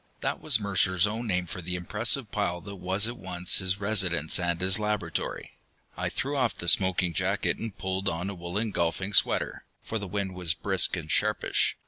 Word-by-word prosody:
That - - -2
was 140 -8 +4
Mercer's 95 -2 +2
own 110 +3 -3
name 90 -3 0
for 90 - -6
the 90 +1 -2
impressive 110 +6 +1
pile 90 -4 -1
that 100 +1 -9
was 95 +4 +2
at 120 +1 -5
once 90 -2 +1
his 95 0 0
residence 95 -7 +2
and 85 -1 0
his 95 +2 +1
laboratory. 105 0 -2 0.4
I - - -2
threw 140 +2 -3
off 125 -4 +1
the 85 - -6
smoking 90 -1 +3
jacket - - 0
and 110 -3 -6
pulled 95 +1 -1
on 85 +2 -3
a 100 - -3
woolen 95 +5 -3
golfing 95 +3 -1
sweater, - - +2 0.2
for 110 - -3
the 100 - -5
wind 95 0 -3
was 90 -3 0
brisk 95 +3 +2
and 80 -3 -5
sharpish. 105 0 +1
95 Hz, 190 wpm, -28 LUFS, 90-105 Hz, 0.4 s, was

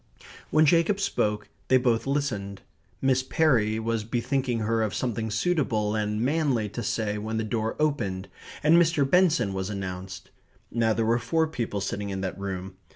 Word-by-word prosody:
When 155 0 +4
Jacob 170 +6 +3
spoke 105 - -1 0.2
they 130 - +5
both 125 -1 +1
listened. 105 -9 -2 0.4
Miss 130 -1 +3
Perry 125 -7 +2
was 110 -1 -1
bethinking 120 +1 -1
her 115 +1 +1
of 110 -3 -1
something 115 -3 -2
suitable 110 -4 0
and 105 0 -1
manly 130 -4 +1
to 120 - -5
say 105 -1 -1
when 110 +1 -3
the 110 - 0
door 110 0 -2
opened 100 -12 -1 0.4
and 155 +3 +6
Mr. 155 -4 +2
Benson 165 - +3
was 95 +1 -3
announced. 95 -2 -6 0.4
Now 115 -2 +2
there 115 +1 0
were 115 +2 +2
four 160 +5 +1
people 120 -9 -3
sitting 100 +1 -3
in 95 -1 -3
that 95 0 -4
room. 95 -1 -5
115 Hz, 165 wpm, -26 LUFS, 105-140 Hz, 0.4 s, and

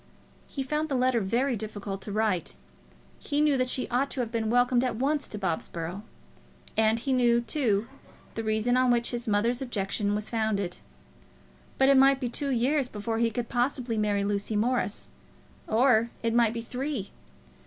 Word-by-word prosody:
He 275 - -4
found 300 +4 -2
the 275 - 0
letter 255 -1 +2
very 235 +6 0
difficult 205 -2 -5
to 205 - -6
write. 210 -4 0 0.6
He 290 -1 -2
knew 300 -2 +4
that 255 -1 0
she 255 - -1
ought 260 +3 +1
to 270 - -5
have 230 -2 -4
been 225 -2 -1
welcomed 245 +1 +3
at 250 -3 -1
once 280 +5 0
to 210 - -7
Bobsborough. 175 -1 -3 0.7
And 220 0 +3
he 260 +3 -1
knew, 240 -2 +3
too, 230 -4 0 0.5
the 225 - -4
reason 220 +3 +1
on 255 0 +3
which 235 -1 +2
his 240 0 -4
mother's 230 +4 +1
objection 205 -4 -1
was 210 0 -3
founded. 215 -5 -1 1.0
But 265 0 +4
it 275 - +6
might 270 0 +5
be 250 -3 -2
two 280 +4 -2
years 260 +2 +1
before 225 +1 -3
he 230 0 +3
could 235 +1 -3
possibly 245 -1 -1
marry 205 -2 +1
Lucy 205 +1 -1
Morris; 220 -1 0 0.6
or 230 0 +3
it 230 -1 +1
might 235 -2 +3
be 230 - -2
three. 250 -2 -4
235 Hz, 175 wpm, -28 LUFS, 215-255 Hz, 1.0 s, it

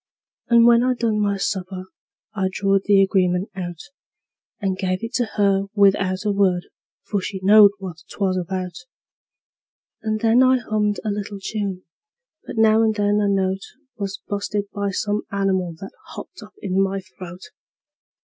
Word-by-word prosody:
And 235 -1 +6
when 235 0 +6
I'd 250 0 +1
done 225 -3 0
my 200 -1 +1
supper 190 -1 -3 0.5
I 190 -3 0
drawed 195 0 +1
the 200 -1 +5
agreement 185 +1 +1
out, 175 -2 -5 0.8
And 195 -4 -1
give 185 +1 -2
it 230 +2 -5
to 245 -1 +1
her 195 -1 +2
without 195 -1 +2
a 210 - +2
word, 190 -3 +1 0.3
for 200 -2 -2
she 190 +1 -5
knowed 205 +1 +8
what 185 -5 -7
'twas 190 -2 -1
about; 185 0 -3 1.3
And 215 -1 -1
then 230 +3 +4
I 260 0 +5
hummed 215 -3 -1
a 215 - 0
little 205 0 -4
tune, 195 -2 -4 0.6
but - - -8
now 220 0 +5
and 220 -1 +2
then 205 0 +2
a 205 - +1
note 190 -1 0 0.3
Was 200 -3 -5
bu'sted 205 0 -3
by 200 -1 -1
some 205 +2 -1
animal 190 -4 0
that 195 - -8 0.2
hopped - - -10
up - - -14
in 190 -1 +1
my 195 0 0
throat. 185 -2 -11
200 Hz, 160 wpm, -22 LUFS, 190-210 Hz, 1.3 s, knowed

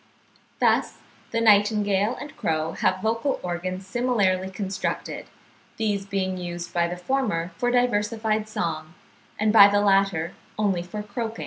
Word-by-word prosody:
Thus, - - +2 0.3
the 230 - -1
nightingale 210 -1 +3
and 290 +2 -9
crow 160 0 -1
have 185 - 0
vocal 230 +5 0
organs 185 +2 -4
similarly 195 -5 +1
constructed, 190 0 -4 0.5
these 205 -3 -1
being 190 -2 -2
used 175 -1 -6
by 170 -1 +2
the 175 +1 -5
former 180 -5 -1
for 245 - 0
diversified 220 -3 0
song, 160 -4 -4 0.4
and 215 0 +2
by 200 -3 +10
the 205 0 +2
latter 195 -4 +2 0.2
only 200 -4 +1
for 210 +4 -6
croaking. 225 +2 -5
200 Hz, 135 wpm, -25 LUFS, 180-220 Hz, 0.5 s, by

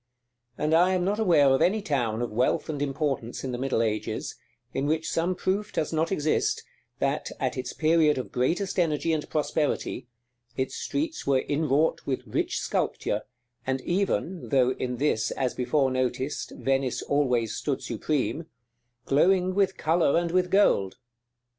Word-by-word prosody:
And 155 +1 0
I 180 +3 +5
am 180 -1 0
not 205 +3 0
aware 165 -10 +5
of 135 0 +3
any 210 +5 +3
town 120 - -1
of 120 - -3
wealth 125 +7 +1
and 145 -2 -3
importance 135 -4 -2
in 130 - -3
the 120 - -4
middle 130 -3 +1
ages, 110 -1 -2 0.4
in 135 +2 -1
which 160 +1 0
some 175 +3 0
proof 195 +4 -1
does 155 - -2
not 160 +2 0
exist, 155 -5 0 0.3
that, - - -1
at - - -1
its 130 -1 -4
period 155 -2 +3
of 130 - -4
greatest 180 +10 0
energy 165 -1 +1
and 155 -1 -2
prosperity, 150 -4 -1 0.5
its 130 - -1
streets 310 - -3
were 135 -2 +3
inwrought 150 +1 +1
with 130 -2 -2
rich 105 - -1
sculpture, 105 - -1 0.5
and 130 0 0
even 185 0 -1
(though 130 -3 +3
in 125 -1 -3
this, 115 -6 +1
as 130 -2 -1
before 130 +2 +1
noticed, 130 +2 -2
Venice 135 -2 0
always 125 -6 +1
stood - - -2
supreme) 155 +2 -2 0.6
glowing 185 +5 +3
with 190 -1 +1
color 160 -2 +2
and 170 0 0
with 180 0 +2
gold. 180 - +3
150 Hz, 160 wpm, -27 LUFS, 130-170 Hz, 0.6 s, I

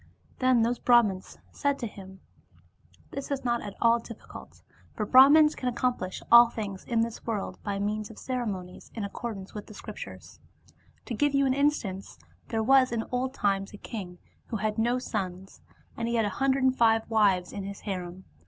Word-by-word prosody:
Then 255 -3 +4
those 240 +1 0
Brihmans 220 -6 +2
said 280 -1 0
to 245 - -4
him: 190 -3 -10 0.4
" - - -32
This 275 - -6
is 275 -2 -3
not 240 -1 +1
at 205 - -7
all 235 0 +4
difficult, 230 -1 -12 0.3
for 210 - -2
Brahmans 290 +6 +7
can 250 - -2
accomplish 240 -6 -2
all 235 0 +9
things 205 -5 -6
in 230 -2 +1
this 230 -1 -3
world 215 -4 -3
by 205 - -3
82 - - -3
DevasmUd 200 - -1
means 215 0 -3
of 225 - -12
ceremonies 205 -8 -5
in 220 - -3
accordance 200 -1 -6
with 210 - -7
the 215 - -12
Scriptures. - - -9 0.7
To 245 - -5
give 285 +5 +1
you 275 0 +3
an 260 - +2
instance, 260 -9 -1 0.3
there 225 -1 -1
was 260 +1 +5
in 230 -1 -1
old 255 +2 -2
times 195 0 0
a - - -9
king 185 -5 -7 0.3
who 225 - -3
had 215 +1 -2
no 240 +2 +2
sons, 190 -6 -5 0.3
and 230 - -3
he 235 - -1
had 225 -2 +2
a - - 0
hundred 270 +3 0
and 260 0 +3
five 225 -2 +3
wives 200 -5 +2
in 200 - -5
his 200 +1 -7
harem. 185 -2 -5
225 Hz, 195 wpm, -28 LUFS, 200-250 Hz, 0.7 s, all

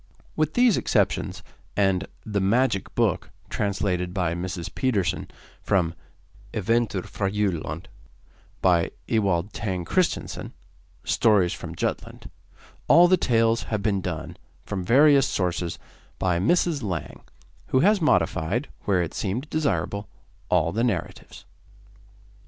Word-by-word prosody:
With 155 0 0
these 245 -3 +5
exceptions, - - 0 0.3
and 95 -2 +2 0.2
'The 105 -2 -1
Magic 110 0 +1
Book,' - - +1 0.2
translated 95 -3 -1
by 90 -4 0
Mrs. 85 -1 -5
Pedersen, 110 - 0 0.3
from 85 -4 +1 0.6
'Eventyr 110 -2 0
fra 100 -2 -2
Jylland,' 90 -6 -2 0.8
by 85 -2 +4
Mr. - - -8 0.2
Ewald 100 -3 +1
Tang 95 -6 -3
Kristensen 180 - -1 0.5
(Stories 100 -6 +3
from - - -7
Jutland), - - -4 0.6
all 170 +4 +7
the 185 - +5
tales 115 -6 +2
have 105 -2 -2
been 100 -2 +1
done, 85 -3 -5 0.3
from 95 -2 -3
various 140 +6 +5
sources, 90 -2 -2 0.4
by 90 -2 +1
Mrs. 165 - +2
Lang, 90 - -4 0.5
who 130 - +2
has 205 +1 +4
modified, 95 - +1 0.2
where 95 -3 +2
it 85 - -5
seemed 115 +9 -3
desirable, 140 -9 -1 0.4
all 85 - +2
the 115 +5 0
narratives. 105 -9 -3
100 Hz, 120 wpm, -25 LUFS, 90-120 Hz, 0.8 s, all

